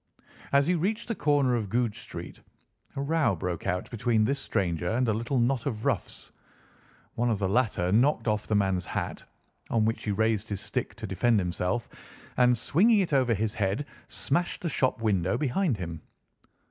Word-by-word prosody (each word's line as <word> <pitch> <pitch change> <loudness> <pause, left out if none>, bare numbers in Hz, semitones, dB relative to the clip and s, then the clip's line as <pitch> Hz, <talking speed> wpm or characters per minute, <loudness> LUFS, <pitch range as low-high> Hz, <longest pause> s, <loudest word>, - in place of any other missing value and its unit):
As 140 0 +4
he 175 - +2
reached 210 +8 -1
the - - +1
corner 145 - +2
of 110 -5 -1
Goodge 115 0 0
Street, 85 -8 -9 0.5
a 135 - -2
row 155 -7 +2
broke 90 +1 -4
out 90 -1 -1
between 115 -1 +2
this 140 +4 0
stranger 90 -5 -1
and 125 +4 +1
a 110 - +2
little 120 +5 -1
knot 125 +1 +1
of 110 -3 -3
roughs. 130 -9 -2 0.8
One 120 +1 0
of 110 - +1
the 95 -1 0
latter 105 -4 +1
knocked 125 +6 +3
off 105 -1 0
the 105 - +1
man's 95 -4 +1
hat, - - -4 0.5
on 110 -2 +2
which 115 +1 -1
he 105 - 0
raised 110 +1 0
his 100 -2 -2
stick - - -3
to - - -7
defend 120 -2 +2
himself 90 +4 -1 0.5
and, 125 -1 +4
swinging 200 - +3
it 175 -5 -2
over 130 -4 +3
his 105 +1 -1
head, 105 +5 -1 0.2
smashed 175 +7 -1
the 170 - 0
shop 130 -4 0
window 95 0 +1
behind 150 - 0
him. 85 -4 -6
115 Hz, 185 wpm, -28 LUFS, 100-135 Hz, 0.8 s, As